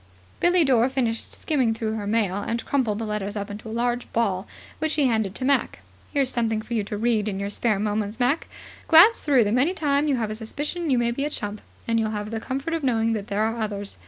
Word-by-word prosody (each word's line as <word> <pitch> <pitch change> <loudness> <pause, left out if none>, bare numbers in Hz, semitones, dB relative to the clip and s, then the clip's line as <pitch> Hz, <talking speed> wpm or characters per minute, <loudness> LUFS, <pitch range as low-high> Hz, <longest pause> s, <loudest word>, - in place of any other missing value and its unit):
Billie 350 0 +4
Dore 255 -3 +3
finished 240 -4 -2
skimming 255 -7 +1
through 220 -1 -2
her 210 -2 -4
mail, 205 -3 +1
and 230 +3 -3
crumpled 245 -7 0
the 225 - -3
letters 210 -1 -3
up 205 0 -4
into 215 +2 -8
a - - -6
large 240 +1 -1
ball, 200 -4 0 0.3
which 315 0 0
she 295 - +2
handed 220 -6 0
to 255 - -3
Mac. 280 +1 +1 0.3
"Here's 275 -3 +1
something 225 -2 0
for 235 - -7
you 220 -3 +1
to 210 - -4
read 220 -1 +1
in 195 -2 -2
your 200 +1 -3
spare 215 0 +1
moments, 210 +2 -2
Mac. 255 +6 +1 0.4
Glance 360 +8 +7
through 275 -5 +4
them 215 +4 +1
any 330 +8 +2
time 290 -2 +1
you 285 - +2
have 220 -3 -2
a - - -2
suspicion 295 +9 -4
you 260 - +3
may 235 0 +1
be 275 +4 -2
a 295 - -1
chump, 210 -7 -4 0.3
and 230 0 +2
you'll 220 -1 0
have 210 0 -4
the 225 - -2
comfort 270 +8 -3
of 330 - -1
knowing 230 -3 +2
that 210 -2 -4
there 205 +1 0
are 225 +1 -1
others. 205 -2 -4
230 Hz, 245 wpm, -24 LUFS, 210-265 Hz, 0.4 s, Glance